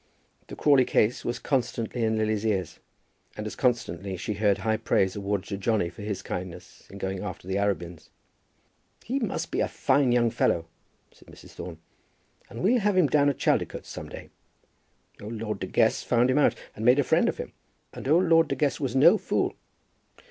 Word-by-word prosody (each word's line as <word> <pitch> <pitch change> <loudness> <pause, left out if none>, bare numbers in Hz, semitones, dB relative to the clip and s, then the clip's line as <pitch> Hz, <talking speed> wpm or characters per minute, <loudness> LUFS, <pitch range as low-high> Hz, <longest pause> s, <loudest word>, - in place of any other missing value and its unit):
The - - -8
Crawley 140 -3 +4
case 110 +1 +1
was 120 0 -2
constantly 120 -3 -2
in 110 0 +1
Lily's 110 -1 0
ears, 95 -6 -1 0.6
and 105 - -5
as 105 - -5
constantly 100 -7 -1
she 100 +4 -3
heard 105 -1 +2
high 110 +3 0
praise 95 -3 +1
awarded 100 -1 -3
to 100 - -3
Johnny 100 -3 0
for 105 - -12
his 105 -1 -4
kindness 90 -1 -7
in 100 - -10
going 95 -1 -3
after 95 -2 -7
the 95 +1 -1
Arabins. 90 -5 -3 0.9
"He 265 +4 -2
must 180 -8 -3
be - - -1
a - - +2
fine 140 -3 +2
young 120 -1 +3
fellow," 85 -7 +1 0.5
said - - -22
Mrs. - - -14
Thorne, - - -8 0.7
"and 115 - -7
we'll 240 +6 +4
have 205 -2 +1
him 180 - +5
down 145 0 +3
at 140 - -2
Chaldicotes - - 0
some - - -7
day. - - -10 0.9
Old 105 +3 -6
Lord 105 -3 -4
De 95 - -4
Guest 110 +3 +2
found 125 +1 +3
him 130 - +1
out - - +3 0.2
and 110 - -6
made 125 +3 +5
a 145 - +3
friend - - +3
of - - -4
him, - - -7 0.4
and - - -7
old 170 +6 +4
Lord 165 -1 +5
De - - -2
Guest 145 -3 0
was 130 -3 -2
no 170 +10 +6
fool." - - -1
110 Hz, 195 wpm, -26 LUFS, 100-135 Hz, 0.9 s, no